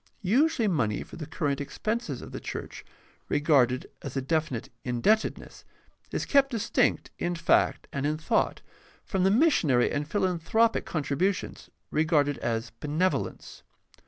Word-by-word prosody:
Usually 240 Hz, -, +3 dB
money 110 Hz, -, 0 dB
for -, -, -12 dB
the 155 Hz, -3 st, -6 dB
current 145 Hz, -3 st, -1 dB
expenses 215 Hz, -, -3 dB
of -, -, -10 dB
the -, -, -5 dB
church, -, -, -7 dB, 0.5 s
regarded 135 Hz, -4 st, +3 dB, 0.2 s
as 140 Hz, -1 st, -6 dB
a -, -, +1 dB
definite 155 Hz, -5 st, -1 dB
mdebtedness, 130 Hz, -, 0 dB, 0.5 s
is -, -, -2 dB
kept 275 Hz, -1 st, +4 dB
distinct 230 Hz, -6 st, 0 dB
m 175 Hz, 0 st, -1 dB
fact 165 Hz, 0 st, +2 dB
and 140 Hz, -, -2 dB
in 155 Hz, +1 st, 0 dB
thought 160 Hz, -, 0 dB, 0.4 s
from 190 Hz, -2 st, 0 dB
the 190 Hz, -, +5 dB
missionary 195 Hz, -, +3 dB
and 145 Hz, +1 st, -2 dB
philanthropic 190 Hz, +5 st, +1 dB
contribu 160 Hz, +5 st, 0 dB
tions, -, -, -9 dB, 0.2 s
regarded 150 Hz, -2 st, +2 dB
as 115 Hz, 0 st, -2 dB
benevolence. 160 Hz, +6 st, -2 dB
160 Hz, 135 wpm, -28 LUFS, 140-200 Hz, 0.5 s, the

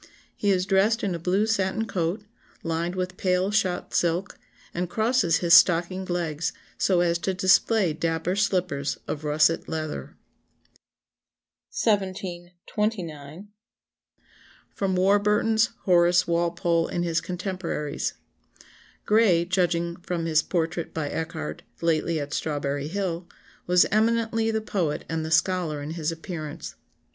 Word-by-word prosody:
He 205 Hz, -, -1 dB
is 185 Hz, -2 st, +2 dB
dressed 200 Hz, +4 st, +2 dB
in 195 Hz, -3 st, 0 dB
a 170 Hz, -, -4 dB
blue 185 Hz, +5 st, +1 dB
satin 220 Hz, 0 st, 0 dB
coat, 180 Hz, 0 st, -2 dB, 0.4 s
lined 165 Hz, +2 st, -2 dB
with 180 Hz, 0 st, -3 dB
pale 185 Hz, +1 st, +1 dB
shot 190 Hz, -4 st, 0 dB
silk, 175 Hz, +3 st, 0 dB, 0.4 s
and 175 Hz, 0 st, -2 dB
crosses 220 Hz, -6 st, +2 dB
his 170 Hz, -, +5 dB
stockinged 180 Hz, +2 st, +5 dB
legs 165 Hz, -3 st, -2 dB, 0.2 s
so 180 Hz, -3 st, +2 dB
as 170 Hz, -1 st, +1 dB
to 190 Hz, +2 st, -2 dB
display 190 Hz, 0 st, +3 dB
dapper 165 Hz, +3 st, -1 dB
slippers 180 Hz, -8 st, 0 dB
of 150 Hz, -, -4 dB
russet 155 Hz, +2 st, +2 dB
leather." 155 Hz, -1 st, -5 dB, 1.5 s
1729. 185 Hz, -, -3 dB, 1.3 s
[Sidenote: 190 Hz, -2 st, 0 dB
Warburton's 210 Hz, +4 st, +3 dB
Horace 175 Hz, -1 st, +4 dB
Walpole 170 Hz, 0 st, +1 dB
and 175 Hz, -, -2 dB
his 170 Hz, -1 st, 0 dB
contemporaries. 180 Hz, -5 st, -3 dB, 0.5 s
*] -, -, -27 dB
"Gray, 205 Hz, -6 st, +4 dB
judging 170 Hz, -2 st, 0 dB
from 175 Hz, -1 st, -4 dB
his 160 Hz, -1 st, +3 dB
portrait 165 Hz, -1 st, -2 dB
by 155 Hz, -3 st, -2 dB
Echardt, 110 Hz, -, -4 dB, 0.2 s
lately 165 Hz, 0 st, +1 dB
at 145 Hz, 0 st, -5 dB
Strawberry 145 Hz, -2 st, -2 dB
Hill, 175 Hz, -1 st, -3 dB, 0.4 s
was 180 Hz, 0 st, +5 dB
eminently 225 Hz, +1 st, +2 dB
the 220 Hz, 0 st, 0 dB
poet 180 Hz, -8 st, -2 dB
and 160 Hz, -1 st, -2 dB
the 160 Hz, -, -4 dB
scholar 170 Hz, -3 st, +1 dB
in 145 Hz, +2 st, -6 dB
his 165 Hz, -1 st, -2 dB
appearance. 165 Hz, -2 st, -7 dB
175 Hz, 125 wpm, -25 LUFS, 165-195 Hz, 1.5 s, his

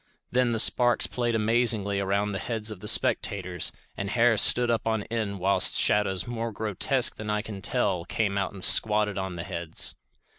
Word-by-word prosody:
Then 125 Hz, -1 st, 0 dB
the 115 Hz, -, -2 dB
sparks 120 Hz, +1 st, +3 dB
played 120 Hz, -2 st, -3 dB
amazingly 110 Hz, -3 st, +1 dB
around 100 Hz, +1 st, -2 dB
the 95 Hz, -, -5 dB
heads 110 Hz, 0 st, -3 dB
of 105 Hz, -, -10 dB
the -, -, -10 dB
spectators, 95 Hz, -4 st, +1 dB, 0.2 s
and 100 Hz, -, -6 dB
hair 115 Hz, +1 st, +1 dB
stood 120 Hz, +3 st, +4 dB
up 115 Hz, -1 st, -3 dB
on 110 Hz, -2 st, -2 dB
end 105 Hz, -4 st, -4 dB
whilst 95 Hz, +2 st, +3 dB
shadows 95 Hz, -3 st, 0 dB
more 115 Hz, -1 st, -6 dB
grotesque 110 Hz, +5 st, +1 dB
than 105 Hz, 0 st, -8 dB
I 105 Hz, 0 st, -2 dB
can 105 Hz, -3 st, -9 dB
tell 90 Hz, -2 st, -1 dB
came 100 Hz, +1 st, -3 dB
out 100 Hz, -1 st, -3 dB
and 95 Hz, -2 st, -6 dB
squatted 105 Hz, -2 st, +4 dB
on 95 Hz, -2 st, -6 dB
the 85 Hz, -, -7 dB
heads. 85 Hz, -1 st, -3 dB
105 Hz, 185 wpm, -25 LUFS, 100-115 Hz, 0.2 s, stood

